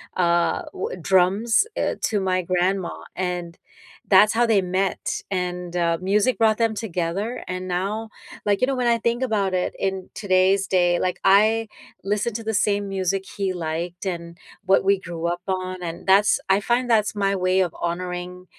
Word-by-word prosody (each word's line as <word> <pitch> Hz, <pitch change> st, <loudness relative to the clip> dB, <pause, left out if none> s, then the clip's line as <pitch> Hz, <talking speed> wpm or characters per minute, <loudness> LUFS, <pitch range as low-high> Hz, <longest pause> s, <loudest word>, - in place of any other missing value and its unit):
uh, 170 Hz, -1 st, +2 dB
wha 185 Hz, -, -4 dB
drums, 195 Hz, -, +3 dB
uh, -, -, 0 dB
to 205 Hz, -3 st, +1 dB
my 185 Hz, -1 st, +1 dB
grandma, 180 Hz, +1 st, 0 dB, 0.2 s
and 180 Hz, -2 st, -3 dB, 0.5 s
that's 205 Hz, +2 st, +7 dB
how 240 Hz, +2 st, +3 dB
they 220 Hz, -4 st, +3 dB
met, 185 Hz, +1 st, -1 dB
and, 180 Hz, -2 st, -3 dB
uh, 170 Hz, -1 st, +1 dB
music 205 Hz, +5 st, +2 dB
brought 220 Hz, 0 st, +3 dB
them 230 Hz, -1 st, +1 dB
together, 200 Hz, +2 st, -3 dB
and 185 Hz, 0 st, -4 dB
now, 195 Hz, +5 st, -2 dB, 0.4 s
like, 205 Hz, +1 st, +1 dB
you 255 Hz, -, +3 dB
know, 275 Hz, -, 0 dB
when 250 Hz, -1 st, 0 dB
I 235 Hz, -1 st, +3 dB
think 235 Hz, +2 st, 0 dB
about 210 Hz, -7 st, 0 dB
it 180 Hz, -1 st, -1 dB
in 190 Hz, -1 st, -3 dB
today's 190 Hz, 0 st, +2 dB
day, 175 Hz, -2 st, +3 dB
like, 180 Hz, 0 st, -1 dB
I 215 Hz, +3 st, +4 dB, 0.4 s
listen 210 Hz, +3 st, -1 dB
to 230 Hz, -, -4 dB
the 220 Hz, 0 st, -2 dB
same 205 Hz, 0 st, +1 dB
music 195 Hz, 0 st, -1 dB
he 195 Hz, -2 st, 0 dB
liked 175 Hz, +1 st, -4 dB
and 170 Hz, -2 st, -5 dB, 0.3 s
what 190 Hz, 0 st, +3 dB
we 200 Hz, 0 st, +4 dB
grew 170 Hz, -2 st, -5 dB
up 175 Hz, +1 st, -2 dB
on, 185 Hz, -1 st, -3 dB
and 170 Hz, +1 st, -6 dB
that's 200 Hz, +2 st, +5 dB
I 195 Hz, +1 st, +3 dB
find 240 Hz, +3 st, 0 dB
that's 215 Hz, -2 st, +2 dB
my 200 Hz, -1 st, +1 dB
way 185 Hz, 0 st, +1 dB
of 180 Hz, -3 st, 0 dB
honoring 180 Hz, +1 st, -4 dB
190 Hz, 180 wpm, -23 LUFS, 180-210 Hz, 0.5 s, that's